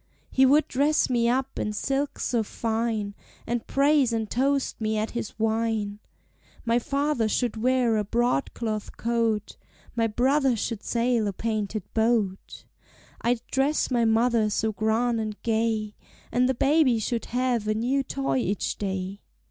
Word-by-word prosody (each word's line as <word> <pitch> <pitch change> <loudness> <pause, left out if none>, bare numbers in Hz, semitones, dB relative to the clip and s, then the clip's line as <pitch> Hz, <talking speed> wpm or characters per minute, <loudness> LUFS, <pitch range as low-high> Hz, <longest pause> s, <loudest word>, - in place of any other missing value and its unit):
"He 265 0 +5
would 295 +3 +4
dress 285 +1 +2
me 235 -1 +2
up 265 +2 -1
in 210 - -1
silks 275 +6 -2
so 235 -2 +1
fine, 220 -1 -2 0.3
And 235 0 -3
praise 280 -2 +3
and 225 -1 -1
toast 275 0 0
me 215 0 0
at 215 +1 -1
his 235 -3 -5
wine. 220 -2 -1 0.7
"My 235 +1 +3
father 275 -3 0
should 240 +1 0
wear 240 0 +2
a 210 - +1
broadcloth 220 - -1
coat, 230 -2 -1 0.4
My 230 -1 +2
brother 260 +4 +2
should 225 0 -3
sail 235 -2 +1
a 200 - -2
painted 215 -1 -2
boat. 220 -4 0 0.6
"I 240 +1 +2
'd 230 - -14
dress 275 +2 +1
my 240 -2 +2
mother 225 -1 +3
so 220 +1 0
grand 225 +3 +1
and 215 -1 -5
gay, 220 -2 0 0.4
And 250 +2 +2
the 265 - +1
baby 275 -2 +3
should 230 +2 -2
have 245 -3 0
a 215 - +1
new 250 +5 +1
toy 135 - -2
each 195 +9 -1
day. 190 0 -3
230 Hz, 155 wpm, -26 LUFS, 215-255 Hz, 0.7 s, He